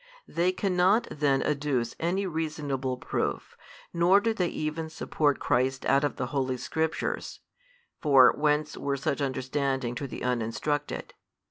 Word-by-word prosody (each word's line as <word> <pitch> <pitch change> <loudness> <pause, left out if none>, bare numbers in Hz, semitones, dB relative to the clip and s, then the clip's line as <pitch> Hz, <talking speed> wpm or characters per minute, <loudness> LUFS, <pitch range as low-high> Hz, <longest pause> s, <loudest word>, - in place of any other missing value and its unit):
They 175 +2 +1
cannot 190 +3 +2
|180 - - -8
then 140 -2 +3
adduce 140 -5 -1
any 185 +4 0
reasonable 150 -6 -2
proof, - - -3 0.4
nor 175 +3 +5
do 225 +2 0
they 180 -5 0
even 160 0 -3
support 150 -2 0
Christ 130 +2 0
out 140 +1 +3
of 145 - 0
the - - -2
holy 130 -2 0
Scriptures 160 +5 -2 0.6
(for, 135 -4 +6
whence 150 0 +1
were 140 0 -2
such 140 +2 -1
understanding 135 -1 -1
to 140 +3 -4
the - - -7
uninstructed?) 125 +5 -2
145 Hz, 140 wpm, -28 LUFS, 135-160 Hz, 0.6 s, for